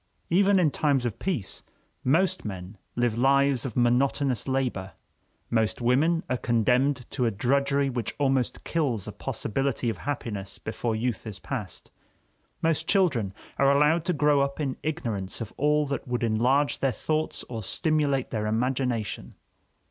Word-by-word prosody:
Even 195 Hz, +3 st, +5 dB
in 165 Hz, -5 st, +3 dB
times 140 Hz, -5 st, +1 dB
of 115 Hz, -2 st, -3 dB
peace, 150 Hz, -, -2 dB, 0.4 s
most 185 Hz, +8 st, +2 dB
men 95 Hz, -1 st, -6 dB, 0.2 s
live 120 Hz, -2 st, +1 dB
lives 135 Hz, +1 st, +3 dB
of 120 Hz, -, -7 dB
monotonous 125 Hz, +1 st, +2 dB
labor, 125 Hz, -8 st, -1 dB, 0.6 s
most 110 Hz, -2 st, +1 dB
women 145 Hz, +8 st, +2 dB
are 125 Hz, -, 0 dB
condemned 125 Hz, +3 st, +2 dB
to 125 Hz, -4 st, 0 dB
a -, -, +4 dB
drudgery 140 Hz, +6 st, +1 dB
which 125 Hz, -3 st, -3 dB
almost 135 Hz, -3 st, 0 dB
kills 135 Hz, -, -1 dB
the -, -, -5 dB
possibility 130 Hz, 0 st, -2 dB
of -, -, -8 dB
happiness 110 Hz, -8 st, -4 dB
before 115 Hz, +1 st, -3 dB
youth 115 Hz, -1 st, -2 dB
is 105 Hz, -3 st, -6 dB
past, 115 Hz, -7 st, -6 dB, 0.7 s
most 160 Hz, 0 st, +1 dB
children 140 Hz, -, +2 dB, 0.3 s
are 140 Hz, 0 st, +5 dB
allowed 150 Hz, +4 st, +4 dB
to 180 Hz, -, 0 dB
grow 150 Hz, -3 st, +3 dB
up 140 Hz, +1 st, -1 dB
in 135 Hz, -4 st, -1 dB
ignorance 115 Hz, -, -3 dB
of 115 Hz, -2 st, -6 dB
all 150 Hz, +1 st, +2 dB
that 140 Hz, -1 st, -4 dB
would 125 Hz, -1 st, -1 dB
enlarge 125 Hz, +6 st, +2 dB
their 135 Hz, -, +2 dB
thoughts 155 Hz, +7 st, -2 dB
or 115 Hz, -2 st, -5 dB
stimulate 145 Hz, -, 0 dB
their 105 Hz, -2 st, -1 dB
imagination. 120 Hz, 0 st, -1 dB
130 Hz, 150 wpm, -27 LUFS, 115-145 Hz, 0.7 s, Even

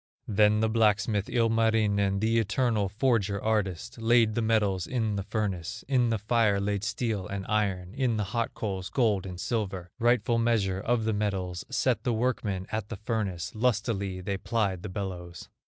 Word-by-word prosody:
Then 105 Hz, +1 st, +3 dB
the 110 Hz, -, +3 dB
blacksmith, 105 Hz, -2 st, +2 dB
Ilmarinen, 110 Hz, -4 st, +2 dB
The 115 Hz, +1 st, +3 dB
eternal 110 Hz, -2 st, +1 dB
forger 105 Hz, -3 st, +1 dB
artist, 95 Hz, -, -2 dB
Laid 115 Hz, -1 st, +4 dB
the 115 Hz, -, 0 dB
metals 105 Hz, -5 st, +1 dB
in 110 Hz, -5 st, -1 dB
the 100 Hz, -, -1 dB
furnace, 105 Hz, 0 st, -3 dB
In 125 Hz, -3 st, +2 dB
the 115 Hz, -, +1 dB
fire 105 Hz, -1 st, +2 dB
laid 100 Hz, 0 st, -1 dB
steel 105 Hz, -2 st, -2 dB
and 100 Hz, -1 st, -5 dB
iron, 100 Hz, -4 st, -1 dB
In 125 Hz, -4 st, 0 dB
the 105 Hz, -, 0 dB
hot 115 Hz, +4 st, -2 dB
coals, 95 Hz, -4 st, -3 dB
gold 105 Hz, -7 st, +1 dB
and 90 Hz, -1 st, -7 dB
silver, 95 Hz, -3 st, -3 dB
Rightful 120 Hz, -1 st, +2 dB
measure 105 Hz, -5 st, +1 dB
of 115 Hz, +2 st, 0 dB
the 110 Hz, -, +1 dB
metals; 95 Hz, -4 st, -2 dB
Set 130 Hz, -1 st, +1 dB
the 120 Hz, -, +1 dB
workmen 110 Hz, -5 st, -1 dB
at 110 Hz, -2 st, -3 dB
the 115 Hz, -, -5 dB
furnace, 105 Hz, -5 st, -3 dB
Lustily 105 Hz, -5 st, 0 dB
they 100 Hz, +1 st, -2 dB
plied 100 Hz, -6 st, -1 dB
the 105 Hz, -, -6 dB
bellows. 90 Hz, -3 st, -6 dB
105 Hz, 170 wpm, -28 LUFS, 95-115 Hz, -, Laid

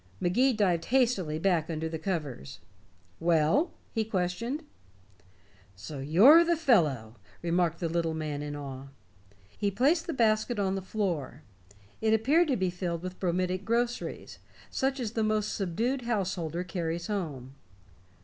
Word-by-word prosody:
Magee 245 Hz, +10 st, +3 dB
dived 185 Hz, -7 st, +1 dB
hastily 230 Hz, -12 st, +1 dB
back 165 Hz, -2 st, +1 dB
under 160 Hz, 0 st, -2 dB
the 160 Hz, 0 st, -5 dB
covers. 150 Hz, -, -4 dB, 0.6 s
"Well?" 170 Hz, -, +2 dB, 0.2 s
he 225 Hz, -, 0 dB
questioned. 220 Hz, -, -2 dB, 1.1 s
"So 120 Hz, +10 st, -8 dB
you're 205 Hz, -, +7 dB
the 340 Hz, 0 st, +1 dB
fellow," 150 Hz, -, +2 dB, 0.3 s
remarked 170 Hz, -1 st, +1 dB
the 170 Hz, -, -1 dB
little 165 Hz, -1 st, -1 dB
man 150 Hz, -2 st, -3 dB
in 145 Hz, 0 st, -5 dB
awe. 135 Hz, -2 st, -7 dB, 0.7 s
He 205 Hz, -, 0 dB
placed 280 Hz, -, +2 dB
the 330 Hz, -, -2 dB
basket 225 Hz, -1 st, +2 dB
on 195 Hz, -2 st, 0 dB
the 195 Hz, -, -2 dB
floor; 170 Hz, -, -3 dB, 0.6 s
it 220 Hz, 0 st, +3 dB
appeared 290 Hz, +10 st, +3 dB
to 270 Hz, -, +1 dB
be 185 Hz, -2 st, 0 dB
filled 175 Hz, -2 st, -4 dB
with 185 Hz, 0 st, -6 dB
bromidic 185 Hz, +1 st, -1 dB
groceries, 235 Hz, +3 st, -2 dB, 0.3 s
such 270 Hz, +1 st, 0 dB
as 230 Hz, -4 st, -2 dB
the 225 Hz, -1 st, -1 dB
most 215 Hz, -1 st, 0 dB
subdued 225 Hz, +8 st, -1 dB
householder 180 Hz, -7 st, -2 dB
carries 170 Hz, -1 st, -3 dB
home. 150 Hz, -, -4 dB
185 Hz, 140 wpm, -29 LUFS, 160-230 Hz, 1.1 s, you're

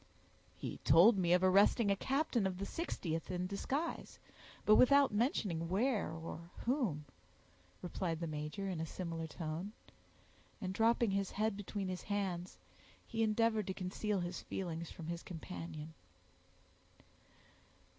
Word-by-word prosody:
"He -, -, -5 dB
told 175 Hz, +10 st, +7 dB
me 180 Hz, -3 st, +1 dB
of 180 Hz, +1 st, +5 dB
arresting 200 Hz, +3 st, +5 dB
a -, -, +3 dB
captain 260 Hz, -3 st, +1 dB
of 185 Hz, -1 st, -4 dB
the 200 Hz, -, -3 dB
60th 170 Hz, -, -3 dB
in 180 Hz, -1 st, -1 dB
disguise, 260 Hz, -, -3 dB, 0.5 s
but 215 Hz, -, +7 dB
without 280 Hz, 0 st, +6 dB
mentioning 200 Hz, -, 0 dB
where 220 Hz, +4 st, +1 dB
or 165 Hz, +1 st, -7 dB, 0.2 s
whom," 230 Hz, -, 0 dB, 0.8 s
replied 175 Hz, -2 st, -2 dB
the 170 Hz, -, -2 dB
major 155 Hz, +5 st, -4 dB
in 180 Hz, -4 st, -2 dB
a -, -, -1 dB
similar 165 Hz, -1 st, -4 dB
tone; 165 Hz, +5 st, -5 dB, 0.9 s
and 185 Hz, -3 st, -3 dB
dropping 225 Hz, +1 st, +3 dB
his 195 Hz, -1 st, 0 dB
head 215 Hz, 0 st, 0 dB
between 200 Hz, -1 st, -4 dB
his 185 Hz, -1 st, -3 dB
hands, 190 Hz, -3 st, -3 dB, 0.5 s
he 225 Hz, -1 st, -3 dB
endeavored 220 Hz, -1 st, +2 dB
to 190 Hz, -, -2 dB
conceal 200 Hz, +2 st, -2 dB
his 175 Hz, 0 st, -4 dB
feelings 170 Hz, -3 st, -4 dB
from 165 Hz, -, -9 dB
his 170 Hz, +1 st, -4 dB
companion. 165 Hz, -3 st, -7 dB
190 Hz, 135 wpm, -36 LUFS, 170-215 Hz, 0.9 s, told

